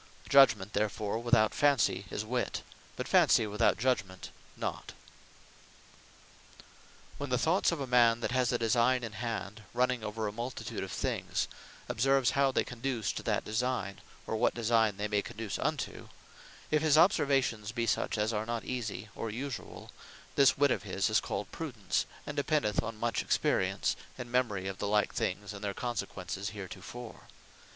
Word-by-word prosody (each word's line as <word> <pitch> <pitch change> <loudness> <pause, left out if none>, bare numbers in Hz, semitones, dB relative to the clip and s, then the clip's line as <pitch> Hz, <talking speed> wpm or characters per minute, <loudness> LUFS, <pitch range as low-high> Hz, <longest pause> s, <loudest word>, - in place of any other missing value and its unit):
Judgement 115 -8 +5
therefore 105 +1 -1
without 120 -2 +3
Fancy 130 -9 +2
is 105 - -3
Wit, 125 +2 -2 0.3
but - - -4
Fancy 115 - +5
without 105 +2 +2
Judgement 100 -7 -1 0.3
not. - - -4
Prudence - - -10 2.2
When 145 0 -4
the 125 - +2
thoughts 170 +9 +2
of 170 - -2
a 135 - -2
man, 120 -2 +4
that - - -1
has 125 -1 +2
a 120 - +2
designe 120 +2 +2
in 115 - -4
hand, 110 -2 -4
running 125 -1 +1
over 110 +1 -3
a - - -2
multitude 120 +4 -5
of - - -6
things, - - -1 0.4
observes 135 +2 +3
how 140 -1 +3
they - - +2
conduce 125 -2 -2
to - - -5
that - - -1
designe; 110 -3 -2 0.2
or - - -2
what 110 - +2
designe 115 -3 +2
they 105 +1 -1
may 105 -1 +1
conduce 110 -1 -5
into; - - -3 0.6
if 150 -1 +3
his 155 -1 +4
observations 135 - +3
be 115 -1 -1
such 115 - 0
as 105 +2 0
are 110 +1 -2
not 115 -1 -3
easie, 110 -4 -4
or 115 - -4
usuall, 125 +4 -6 0.4
This 140 -1 +5
wit 140 -1 +4
of - - 0
his 100 0 -1
is 110 - +5
called 100 - -4
PRUDENCE; 125 -11 -2 0.2
and 150 - -5
dependeth 145 -7 +1
on 115 0 -6
much 120 0 0
Experience, - - +1 0.2
and 120 -1 -7
Memory 110 -7 0
of 95 0 -5
the 100 - -1
like 105 0 +2
things, 105 0 -2
and 100 - -9
their 100 -1 -2
consequences 100 -5 -4
heretofore. 105 +4 -9
115 Hz, 165 wpm, -31 LUFS, 105-125 Hz, 2.2 s, Judgement